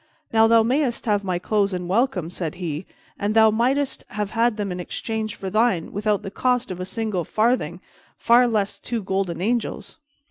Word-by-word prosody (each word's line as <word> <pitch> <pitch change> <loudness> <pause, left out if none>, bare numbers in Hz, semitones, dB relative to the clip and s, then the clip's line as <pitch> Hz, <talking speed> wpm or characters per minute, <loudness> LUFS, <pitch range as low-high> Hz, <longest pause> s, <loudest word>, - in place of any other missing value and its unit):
"Now 225 0 +6
thou 225 0 +5
mayst 255 +1 0
have 205 -2 +1
my 185 -2 -1
clothes 200 +2 0
and 180 -1 -3
welcome," 195 - 0
said 170 -4 -4
he, 170 -1 -4 0.3
"and 205 +2 -1
thou 220 -1 +6
mightest 260 +5 0
have 210 0 -4
had 230 -1 +1
them 205 -2 -2
in 180 - -4
exchange 215 +4 -4
for 190 -1 -6
thine 215 -6 +1
without 210 0 0
the 195 - -6
cost 250 -1 0
of 180 - -6
a 185 - -3
single 210 -3 -2
farthing, 215 -5 0 0.4
far 245 +1 +5
less 205 -3 -1
two 230 -1 -4
golden 190 -3 -2
angels." 235 - -2
210 Hz, 185 wpm, -23 LUFS, 185-230 Hz, 0.4 s, Now